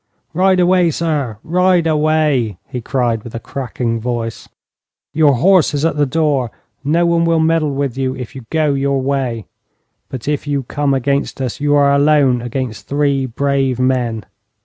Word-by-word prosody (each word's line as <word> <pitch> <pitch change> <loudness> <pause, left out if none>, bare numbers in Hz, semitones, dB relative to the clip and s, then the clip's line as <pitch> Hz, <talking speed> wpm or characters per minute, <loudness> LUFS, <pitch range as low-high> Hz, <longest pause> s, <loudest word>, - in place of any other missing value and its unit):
'Ride 185 +2 +3
away, 180 -1 +3
sir, 150 -9 -2
ride 180 0 +2
away!' 150 - +1
he 125 - -5
cried, 120 -2 -1
with 120 - -9
a - - -3
crackling 120 -3 -3
voice. 115 -1 -4 0.6
'Your 150 -2 +4
horse 175 +3 +3
is 145 +2 0
at 165 - +1
the 145 -1 +1
door, 145 -4 0 0.3
and 145 +2 -1
no 170 +1 +3
one 170 0 +2
will 165 -1 +2
meddle 160 -3 +1
with 140 -3 -2
you 130 -1 -1
if 125 -3 -8
you 130 -4 -10
go 155 -3 +1
your 140 0 0
way; 130 -5 -2 0.6
but 130 -1 -7
if 150 0 -2
you 140 -2 -1
come 140 +2 -1
against 140 +2 -1
us, 130 -3 -3
you 145 0 +2
are 140 -1 +4
alone 140 -3 +3
against 120 -2 -5
three 140 -2 0
brave 135 0 0
men.' 125 -4 0
140 Hz, 170 wpm, -17 LUFS, 125-155 Hz, 0.6 s, Your